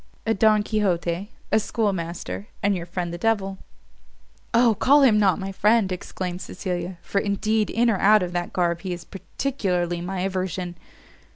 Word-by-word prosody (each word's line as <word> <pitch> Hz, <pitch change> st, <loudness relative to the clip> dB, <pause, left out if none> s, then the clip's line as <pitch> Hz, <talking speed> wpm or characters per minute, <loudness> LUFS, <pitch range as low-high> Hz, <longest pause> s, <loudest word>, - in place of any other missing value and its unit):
"A 225 Hz, -, +2 dB
Don 215 Hz, 0 st, +4 dB
Quixote, 190 Hz, -3 st, -1 dB, 0.2 s
a 220 Hz, -, +5 dB
schoolmaster, 170 Hz, -, -3 dB, 0.2 s
and 200 Hz, 0 st, +3 dB
your 175 Hz, -1 st, -5 dB
friend 175 Hz, -1 st, -3 dB
the 175 Hz, -, -6 dB
devil." 195 Hz, -2 st, 0 dB, 0.9 s
"O, 235 Hz, -1 st, +5 dB
call 280 Hz, +7 st, +4 dB
him 220 Hz, -5 st, +5 dB
not 195 Hz, -4 st, +3 dB
my 195 Hz, 0 st, -4 dB
friend," 210 Hz, 0 st, +3 dB
exclaimed 180 Hz, 0 st, -4 dB
Cecilia, 180 Hz, -1 st, -4 dB
"for 200 Hz, -, 0 dB
indeed 215 Hz, +2 st, 0 dB
in 240 Hz, +2 st, +2 dB
or 220 Hz, -4 st, +2 dB
out 210 Hz, 0 st, +5 dB
of 175 Hz, -, -3 dB
that 175 Hz, 0 st, -2 dB
garb 170 Hz, -2 st, 0 dB
he 185 Hz, -1 st, -3 dB
is 175 Hz, -, -8 dB
particularly 185 Hz, -6 st, -2 dB
my 180 Hz, +1 st, -3 dB
aversion." 185 Hz, -1 st, -2 dB
190 Hz, 165 wpm, -24 LUFS, 175-215 Hz, 0.9 s, a